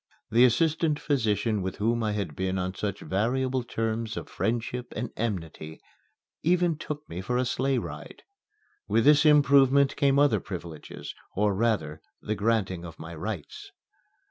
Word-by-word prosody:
The 120 +3 +6
assistant 155 +4 +2
physician 110 -6 0
with 95 0 -3
whom 115 +3 0
I 110 -1 0
had 100 -8 -3
been 95 0 -1
on 90 0 -2
such 100 0 -4
variable 130 +6 0
terms 115 -1 -3
of - - -5
friendship 120 +2 -2
and 120 +2 -3
enmity 80 -8 -4 0.6
even 175 0 +2
took 150 0 -6
me 85 +2 -5
for 125 +6 -1
a 130 - +1
sleigh 130 +2 0
ride. - - -7 0.6
With 115 - +2
this 150 +1 +6
improvement 140 -2 +5
came 140 -1 +3
other 140 -7 +4
privileges 85 -5 -8 0.2
or, 105 +1 +2
rather, 95 -8 0 0.2
the 110 - -3
granting 100 -5 0
of 85 -2 -9
my 80 +1 -8
rights. 85 0 -6
115 Hz, 150 wpm, -27 LUFS, 95-135 Hz, 0.6 s, The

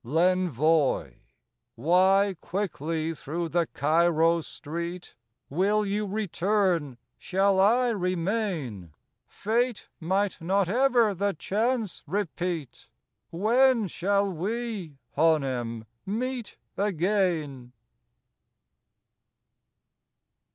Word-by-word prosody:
54 130 +7 -6
L' 180 +2 +5
Envoi 155 - +1 0.6
Why 190 - +3
quickly 165 -4 -2
through 165 +3 -4
the 170 0 +1
Cairo 165 +2 +2
street?— 170 +4 -6 0.3
Will 205 +7 +1
you 205 +1 -1
return?—Shall 190 - 0
I 240 +6 +4
remain? 180 - -2 0.3
Fate 235 +2 -1
might 190 +3 -1
not 190 +3 +1
ever 240 0 +3
the 200 +1 -1
chance 220 +4 -1
repeat; 175 - -3 0.4
When 230 +5 +3
shall 200 +2 0
we, 200 -3 -4 0.2
Hanem, 130 -8 +1 0.2
meet 240 +2 -3 0.2
again? 170 -9 0
185 Hz, 80 wpm, -27 LUFS, 160-205 Hz, 0.6 s, L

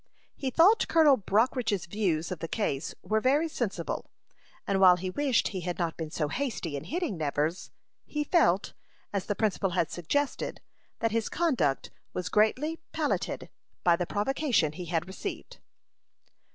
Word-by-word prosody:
He 270 - -2
thought 360 - +5
Colonel 310 -4 +6
Brockridge's 220 -1 +1
views 175 -4 -1
of 180 - -4
the 165 - -4
case 155 -9 -2
were 220 0 +1
very 285 +6 +3
sensible: 240 -9 -3 0.6
and 195 -1 +1
while 185 -2 +8
he 185 +1 -4
wished 275 +1 +1
he 190 -3 -4
had 175 0 -3
not 170 -2 -1
been 160 -2 -5
so 155 -1 -1
hasty 225 - -3
in 140 - -5
hitting 335 - -2
Nevers, 155 +3 -1 0.4
he 300 0 -1
felt, 205 - +2 0.4
as 195 -3 -2
the 205 - 0
principal 200 -2 +1
had 170 - +1
suggested, 275 - -1 0.4
that 230 - +1
his 225 0 0
conduct 250 - 0 0.2
was 180 -1 -3
greatly 260 - +2
palliated 310 -2 -1 0.4
by 175 -1 +5
the 175 0 -2
provocation 225 - +1
he 180 +3 -7
had 170 0 -1
received. 195 - -7
205 Hz, 155 wpm, -29 LUFS, 175-270 Hz, 0.6 s, while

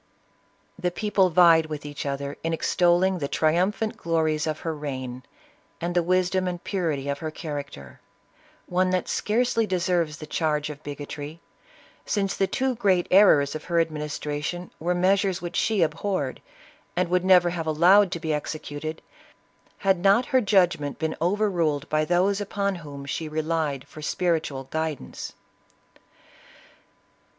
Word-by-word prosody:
The 180 -1 0
people 195 0 +1
vied 165 -2 +6
with 150 -1 -6
each 145 0 -5
other 140 +1 -3
in 165 0 -1
extolling 175 +2 +2
the 140 - -2
tri 155 +2 +2
umphant 205 +5 0
glories 160 -2 0
of 155 0 -3
her 165 - -2
reign, 130 -4 -5 0.6
and 175 +1 -2
the 175 - +3
wisdom 185 +1 +1
and 175 -1 -4
pu 200 - -3
rity 145 -6 -1
of 140 - -4
her 160 - -3
character 145 - -7 0.3
— - - -34 0.3
one 185 +1 +1
that 185 0 0
scarcely 230 0 +1
deserves 175 -4 0
the 155 - -8
charge 150 -1 -1
of 150 0 -11
bigotry, 145 +2 -7 0.6
since 195 -3 -1
the 195 - +1
two 260 +4 0
great 195 -6 +2
errors 165 -8 +6
of 155 - -6
her 170 -1 +1
ad 165 -1 +1
ministration 150 +3 -4
were 175 +3 0
measures 190 +1 +2
which 175 -1 -6
she 215 -5 +2
abhorred, 160 -2 -2 0.5
and 180 0 +1
would 180 0 +2
never 180 -2 +5
have 165 -2 -4
allowed 180 +5 +5
to 170 - -3
be 160 -1 -2
executed, 155 +1 -5 0.7
had 195 -2 +2
not 200 +7 +4
her 260 - +5
judgment 180 - +2
been 160 -1 -2
overruled 170 -6 +1
by 155 0 +2
those 185 +5 +2
upon 200 0 -1
whom 145 -4 -9
she 155 +2 -4
re 155 +1 -2
lied 155 -4 -2
for 155 - -11
spiritual 155 -4 -1
guidance. 160 -3 -4
165 Hz, 155 wpm, -25 LUFS, 150-185 Hz, 0.7 s, vied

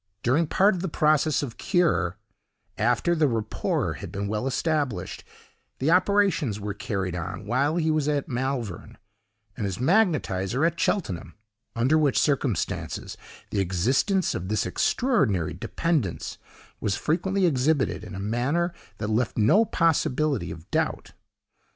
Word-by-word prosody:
During 145 +7 +2
part 195 +6 +4
of 180 - -4
the 190 - -2
process 150 -1 +2
of 120 -5 -7
curé, 170 - +1 0.6
after 120 - +2
the 155 -3 +3
rapport 115 -4 -1
had - - -8
been 100 +1 -3
well 105 +5 -2
established, 145 -2 -1 0.5
the 145 +5 +1
operations 185 - +2
were 105 0 -4
carried 95 -3 -3
on 90 +3 -5
while 135 +8 +1
he 160 -2 +1
was 155 -2 +1
at 145 -2 0
Malvern, 125 -7 -3 0.6
and 105 -4 -2
his 95 - -4
magnetiser 135 - +2
at 170 0 0
Cheltenham, 90 - -1 0.4
under 130 +7 +3
which 145 -4 +2
circumstances 135 - -1 0.4
the 100 - 0
existence 130 - +1
of 90 - -4
this 110 +1 0
extraordinary 110 - +1
dependence 135 - -2 0.4
was 100 -2 0
frequently 190 +4 0
exhibited 145 -2 +1
in - - -8
a - - -5
manner 130 - 0 0.2
that 105 - -3
left 110 +2 0
no 115 - +5
possibility 155 - +1
of 80 0 -9
doubt. - - -1
130 Hz, 140 wpm, -26 LUFS, 105-160 Hz, 0.6 s, no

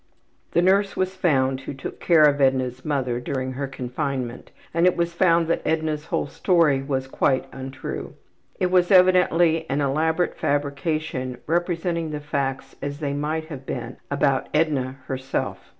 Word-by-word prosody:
The 170 - +3
nurse 195 +2 +3
was 185 0 -1
found 135 -7 +2
who 135 - -7
took 135 - -7
care 165 -3 +5
of 145 -1 +4
Edna's 130 -1 +1
``mother'' 130 -5 -1
during 130 -1 -2
her 135 +2 -3
confinement 130 -1 -4 0.2
and 170 +2 +4
it 180 - +2
was 170 0 0
found 170 -1 +3
that 165 - 0
Edna's 155 -1 -1
whole - - 0
story 155 -2 +2
was 135 -1 -2
quite 130 0 +1
untrue. 135 0 -6 0.4
It 180 -1 +1
was 180 -1 +4
evidently 175 -3 +4
an 140 +2 0
elaborate 160 +5 +1
fabrication 140 -2 -1
representing 170 0 -1
the 150 -1 -4
facts 135 -2 -3
as 145 0 -4
they 145 -3 -2
might 155 +2 -2
have 135 -4 -8
been - - -5
about 140 -1 +1
Edna 145 -5 +1
herself. 130 0 -3
145 Hz, 155 wpm, -24 LUFS, 135-165 Hz, 0.4 s, care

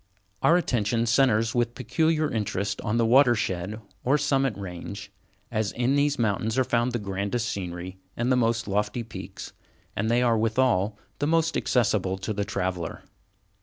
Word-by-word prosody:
Our 170 - +5
attention 115 - 0
centres 115 -2 +3
with 120 -1 0
peculiar 155 +5 +1
interest 100 -2 -2
on 105 +2 -1
the 115 - +3
watershed 110 -6 +3 0.2
or 135 +4 +3
Summit 135 -5 +1
Range, 100 +2 -7 0.4
as 110 -3 0
in 125 +3 +1
these 145 0 +2
mountains 110 +1 0
are 130 - +4
found 120 0 +1
the 120 - -1
grandest 100 +3 -2
scenery 90 -2 -5 0.2
and 120 +2 0
the - - +5
most 115 -1 +1
lofty 105 +4 -1
peaks, 115 - -9 0.4
and 110 - 0
they 120 +1 +3
are 115 -2 +3
withal 110 -3 +1 0.2
the 145 - 0
most 165 0 +2
accessible 100 -6 +1
to 95 +3 -3
the 100 0 -1
traveller. 90 -5 -3
115 Hz, 160 wpm, -26 LUFS, 100-125 Hz, 0.4 s, Our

